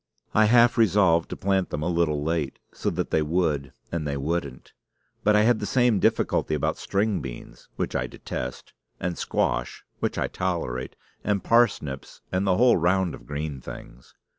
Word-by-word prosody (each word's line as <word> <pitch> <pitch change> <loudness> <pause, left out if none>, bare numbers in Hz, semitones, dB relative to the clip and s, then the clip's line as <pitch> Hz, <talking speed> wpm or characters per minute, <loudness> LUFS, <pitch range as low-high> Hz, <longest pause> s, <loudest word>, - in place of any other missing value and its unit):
I 110 - +5
half 120 +2 +5
resolved 95 -6 +4
to - - -4
plant 95 -1 0
them 75 - -3
a - - -1
little 85 -4 +1
late, 80 -3 -1 0.2
so - - -1
that - - -3
they 80 - +3
would, 75 -4 0 0.2
and 80 -3 -2
they 70 -1 -2
wouldn't. 70 -2 -3 0.5
But 105 0 +4
I 105 - +5
had 115 0 +3
the 105 - -3
same 120 -5 +3
difficulty 80 - +1
about 75 - -1
string 100 -2 0
beans 65 -3 -9
(which - - -3
I 60 - 0
detest), 60 0 -6 0.3
and 90 0 -2
squash - - -1
(which - - -1
I - - 0
tolerate), 65 +1 -3 0.3
and 100 -2 0
parsnips, 100 - +1
and 95 +2 0
the 90 -1 +3
whole 125 -1 +5
round 90 +1 +2
of - - -11
green 75 -2 -4
things. - - -11
85 Hz, 175 wpm, -25 LUFS, 70-100 Hz, 0.5 s, I